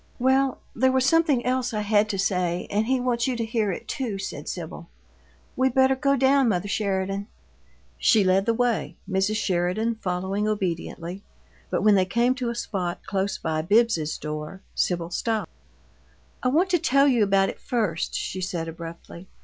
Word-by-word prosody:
"Well, 265 Hz, +1 st, +2 dB, 0.2 s
there 260 Hz, 0 st, +3 dB
was 260 Hz, 0 st, +2 dB
something 300 Hz, -4 st, +3 dB
else 250 Hz, -2 st, 0 dB
I 210 Hz, -, 0 dB
had 210 Hz, 0 st, +2 dB
to 200 Hz, -, -2 dB
say, 180 Hz, -2 st, 0 dB
and 215 Hz, +2 st, +1 dB
he 260 Hz, 0 st, +2 dB
wants 245 Hz, -1 st, 0 dB
you 255 Hz, -, 0 dB
to 230 Hz, -1 st, -2 dB
hear 220 Hz, -2 st, 0 dB
it, -, -, -6 dB
too," 235 Hz, -7 st, -3 dB
said 190 Hz, -6 st, -6 dB
Sibyl. 170 Hz, -1 st, -7 dB, 0.7 s
"We 260 Hz, +1 st, +3 dB
better 265 Hz, +1 st, +3 dB
go 275 Hz, +1 st, +2 dB
down, 270 Hz, -1 st, +4 dB
mother 190 Hz, -1 st, 0 dB
Sheridan." 195 Hz, -1 st, -1 dB, 0.7 s
She 215 Hz, -3 st, +4 dB
led 190 Hz, +2 st, +2 dB
the 230 Hz, -, +3 dB
way, 245 Hz, -2 st, 0 dB
Mrs. 190 Hz, +2 st, +1 dB
Sheridan 190 Hz, +3 st, 0 dB
following 190 Hz, +3 st, -1 dB
obediently, 180 Hz, -2 st, -3 dB, 0.5 s
but -, -, -1 dB
when 215 Hz, -, +6 dB
they 190 Hz, -2 st, +4 dB
came 235 Hz, +7 st, +2 dB
to 255 Hz, -2 st, -3 dB
a 235 Hz, -, -3 dB
spot 185 Hz, -6 st, -3 dB
close 195 Hz, 0 st, -1 dB
by 155 Hz, -1 st, -2 dB
Bibbs's 200 Hz, -4 st, +2 dB
door, 150 Hz, +5 st, -6 dB
Sibyl 175 Hz, -1 st, -1 dB
stopped. 220 Hz, +3 st, -2 dB, 0.9 s
"I -, -, 0 dB
want 335 Hz, +9 st, +2 dB
to 350 Hz, -, +3 dB
tell 275 Hz, 0 st, +4 dB
you 245 Hz, -5 st, +4 dB
about 195 Hz, -1 st, +3 dB
it -, -, -7 dB
first," 210 Hz, -10 st, -1 dB
she 185 Hz, -, -3 dB
said, 175 Hz, -3 st, -3 dB
abruptly. 170 Hz, +2 st, -9 dB
210 Hz, 175 wpm, -25 LUFS, 185-250 Hz, 0.9 s, when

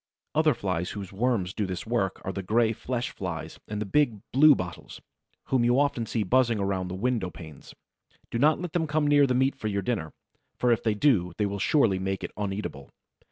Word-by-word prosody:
Other 155 Hz, -2 st, +3 dB
Flies 90 Hz, -4 st, -2 dB
whose 100 Hz, -2 st, -7 dB
worms 100 Hz, -4 st, 0 dB
do 105 Hz, -3 st, -2 dB
this 90 Hz, -1 st, -5 dB
work 110 Hz, -5 st, -1 dB
are 95 Hz, -, -2 dB
the 95 Hz, -, -4 dB
Gray 110 Hz, +4 st, +2 dB
Flesh 125 Hz, +2 st, -3 dB
flies 85 Hz, -6 st, -6 dB
and 105 Hz, 0 st, -4 dB
the 105 Hz, -, -2 dB
big 120 Hz, -1 st, +1 dB
Bluebottles, 130 Hz, -, +3 dB, 0.5 s
whom 130 Hz, -3 st, +2 dB
you 120 Hz, +2 st, +3 dB
often 140 Hz, -5 st, 0 dB
see 110 Hz, -, -1 dB
buzzing 120 Hz, +2 st, +2 dB
about 95 Hz, -2 st, -1 dB
the 90 Hz, -, -5 dB
window 110 Hz, -2 st, -1 dB
panes. 80 Hz, -2 st, -12 dB, 0.6 s
Do 115 Hz, -, -1 dB
not 150 Hz, +4 st, +4 dB
let 175 Hz, -2 st, -5 dB
them 160 Hz, -2 st, 0 dB
come 150 Hz, 0 st, +1 dB
near 145 Hz, -1 st, +5 dB
the 125 Hz, -, +1 dB
meat 130 Hz, +2 st, +2 dB
for 110 Hz, -, -4 dB
your 100 Hz, -2 st, -1 dB
dinner, 90 Hz, -9 st, -2 dB, 0.5 s
for 125 Hz, -, +2 dB
if 115 Hz, -, +2 dB
they 110 Hz, -2 st, 0 dB
do 100 Hz, -, +2 dB
they 105 Hz, -, +1 dB
will 100 Hz, 0 st, -3 dB
surely 105 Hz, -4 st, +3 dB
make 95 Hz, 0 st, -3 dB
it -, -, -4 dB
uneatable. 95 Hz, -9 st, -4 dB
110 Hz, 205 wpm, -27 LUFS, 95-130 Hz, 0.6 s, near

